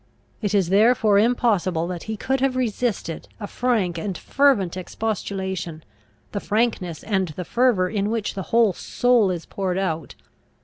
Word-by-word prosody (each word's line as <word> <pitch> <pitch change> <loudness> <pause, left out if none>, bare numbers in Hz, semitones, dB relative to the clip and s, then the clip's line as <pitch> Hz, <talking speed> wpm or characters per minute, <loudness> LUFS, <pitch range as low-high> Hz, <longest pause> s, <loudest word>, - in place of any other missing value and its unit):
It 205 -1 0
is 190 -4 +2
therefore 215 0 +4
impossible 205 -7 +2
that 175 -2 -5
he 220 - -2
could 265 +4 -1
have 270 -1 +1
resisted 230 -8 -2
a 210 - -4
frank 205 -8 0
and 190 +1 -3
fervent 255 -11 +2
expostulation, 190 -4 -4 0.5
the 200 - -2
frankness 205 -7 -1
and 190 -4 0
the 170 +3 -6
fervour 235 -4 +2
in 205 +1 -1
which 225 -2 -2
the 195 - -4
whole 230 -4 +4
soul 245 +1 +2
is 175 -3 -3
poured 190 -2 -2
out. 165 -5 -2
200 Hz, 150 wpm, -23 LUFS, 185-230 Hz, 0.5 s, therefore